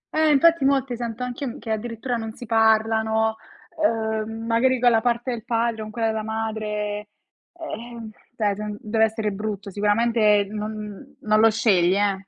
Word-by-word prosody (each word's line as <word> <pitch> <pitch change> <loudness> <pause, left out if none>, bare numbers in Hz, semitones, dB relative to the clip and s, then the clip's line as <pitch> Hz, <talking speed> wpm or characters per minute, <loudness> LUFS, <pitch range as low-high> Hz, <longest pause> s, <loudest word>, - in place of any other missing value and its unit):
Eh, 315 0 +4
infatti, 320 +1 +4
molti 270 -2 +1
sento 235 0 -5
anch'io 250 +2 -4
m 240 - -6
che 225 - -6
addirittura 230 +2 -3
non 225 -1 -5
si 245 - -10
parlano, 220 0 +2 0.5
ehm, 225 -2 -1
magari 245 +2 +2
con 245 -1 +5
la 225 -1 +3
parte 240 +1 0
del 230 -3 -5
padre 230 -1 -1
con 215 - -6
quella 225 +1 -1
della 220 0 -2
madre, 215 -1 -3 0.5
ehm, 235 -8 -8 0.3
cioè 205 -3 +1
gen 210 0 -5
dev'essere 220 -1 0
brutto, 205 -1 -5
sicuramente 210 0 +3
non 215 0 -4
non 210 -2 -9
non 215 0 +2
lo 225 +1 +6
scegli, 195 -5 +3
eh. 200 -1 0
220 Hz, 165 wpm, -23 LUFS, 215-235 Hz, 0.5 s, lo